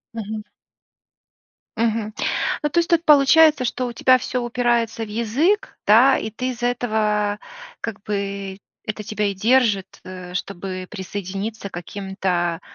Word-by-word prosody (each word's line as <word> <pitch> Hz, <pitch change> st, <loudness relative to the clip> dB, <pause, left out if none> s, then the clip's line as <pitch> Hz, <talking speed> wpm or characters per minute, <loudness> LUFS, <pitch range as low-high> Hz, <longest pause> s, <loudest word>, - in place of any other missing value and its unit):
Мгм. 215 Hz, -1 st, -5 dB, 1.3 s
Мгм. 225 Hz, -1 st, 0 dB, 0.5 s
Ну, 295 Hz, -, +1 dB
то 340 Hz, -, +2 dB
есть 340 Hz, -, 0 dB
тут 335 Hz, -1 st, +3 dB
получается, 300 Hz, -1 st, +6 dB
что 250 Hz, +1 st, -1 dB
у 240 Hz, -, -6 dB
тебя 255 Hz, +2 st, +5 dB
всё 250 Hz, +1 st, -3 dB
упирается 240 Hz, -2 st, 0 dB
в 215 Hz, -, -7 dB
язык, 245 Hz, -, 0 dB
да, 245 Hz, +6 st, +6 dB
и 220 Hz, -, -4 dB
ты 255 Hz, +3 st, -3 dB
из-за 240 Hz, 0 st, -2 dB
этого, 215 Hz, -4 st, 0 dB, 0.4 s
как 220 Hz, -4 st, -5 dB
бы, 200 Hz, -1 st, -4 dB, 0.3 s
это 215 Hz, 0 st, -4 dB
тебя 210 Hz, 0 st, -2 dB
и 200 Hz, -, 0 dB
держит, 215 Hz, -2 st, +2 dB
э, 185 Hz, -1 st, -9 dB
чтобы 185 Hz, 0 st, -5 dB
присоединиться 200 Hz, +1 st, -5 dB
к -, -, -32 dB
каким-то, 180 Hz, -2 st, -2 dB
215 Hz, 140 wpm, -22 LUFS, 195-245 Hz, 1.3 s, получается